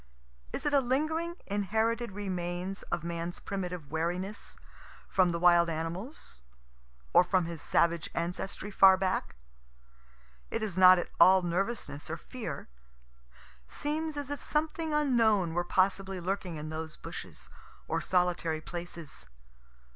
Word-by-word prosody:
Is 280 - -4
it 290 - +1
a 280 - +6
lingering, 310 +7 0
inherited 220 +3 0
remains 185 -1 -3
of 165 - -1
man's 170 0 -4
primitive 180 -7 -5
wariness, 175 +6 -3 0.5
from 185 -2 +3
the 170 - -1
wild 170 0 +5
animals? 165 - -5 0.7
or - - +8
from 185 -1 +1
his 165 -2 -6
savage 170 -1 +2
ancestry 180 +4 -3
far 190 -1 +7
back? 185 - -1 1.1
It 225 - -2
is 205 -5 -2
not 185 0 +8
at 175 - -3
all 190 0 +7
nervousness 175 -4 -2
or 165 - -3
fear. 170 - -7 1.0
Seems 305 - -2
as 285 -1 -4
if 290 - -4
something 315 +1 -1
unknown 230 - +3
were 175 +1 +1
possibly 190 +1 +1
lurking 180 -1 -3
in 155 0 -6
those 160 0 -5
bushes, - - -8 0.4
or 165 +1 -1
solitary 175 -3 +1
places. 170 -2 -8
185 Hz, 130 wpm, -30 LUFS, 170-220 Hz, 1.1 s, or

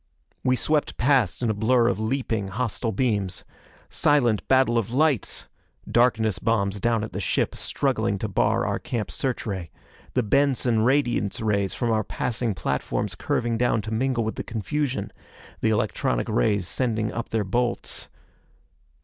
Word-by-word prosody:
We 130 0 +3
swept 150 +3 0
past 125 -5 +2
in 115 - +2
a - - -1
blur 115 +3 +3
of 100 -4 0
leaping 110 -3 -1
hostile 115 +2 -2
beams. 105 -7 -1 0.4
Silent 120 -8 +2
battle 130 -3 +4
of 110 - -3
lights! 140 - +1 0.4
Darkness 115 -4 +2
bombs 100 -3 0
down 115 -2 +1
at 110 - -6
the - - -3
ship - - 0
struggling - - -1
to - - -3
bar - - +1
our - - -1
camp 115 -4 -3
search 130 -2 -2
ray. 95 -6 -4 0.5
The 125 - +3
Benson 130 -1 +2
radiance 120 -4 +1
rays 100 -3 0
from 120 -1 0
our 110 -1 +2
passing 115 +1 -2
platforms 70 -5 -2
curving 115 -2 -1
down 120 -3 +2
to 110 - -4
mingle 125 +1 +1
with 110 - -3
the - - -3
confusion. 135 +5 -2 0.5
The 110 - +1
electronic 85 - 0
rays 90 +10 +1
sending 110 -3 -1
up 115 - -4
their 110 -2 0
bolts.... 120 +5 -1
115 Hz, 155 wpm, -25 LUFS, 105-125 Hz, 0.5 s, battle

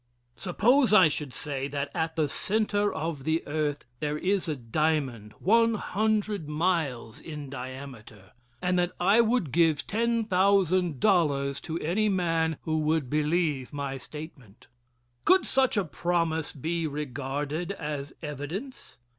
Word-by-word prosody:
Suppose 230 +7 +3
I 185 -6 +7
should 150 -2 -4
say 140 -1 -3
that 140 0 -3
at 160 -1 -2
the 155 -3 +1
center 205 +5 0
of 160 -4 -4
the 160 +3 0
earth 145 -1 -2
there 150 0 -1
is 190 +3 0
a 155 - 0
diamond 130 -3 -1
one 230 +3 +3
hundred 210 -5 -1
miles 150 -8 -1
in 150 -4 -7
diameter, 130 -7 -9 0.3
and 180 0 +2
that 175 0 0
I 200 +6 +5
would 225 - +1
give 160 -1 +3
ten 230 +1 0
thousand 185 - +2
dollars 140 - +2
to 165 -1 -4
any 205 +7 +1
man 165 -4 +1
who 155 -1 0
would 155 -4 0
believe 150 -3 0
my 140 -2 -4
statement. 135 -7 -11 0.6
Could 370 +1 +5
such 260 -4 +2
a 200 - +2
promise 165 -1 -1
be 165 +3 -2
regarded 145 +3 -3
as 150 -5 -5
evidence? 155 - -6
160 Hz, 140 wpm, -28 LUFS, 145-185 Hz, 0.6 s, I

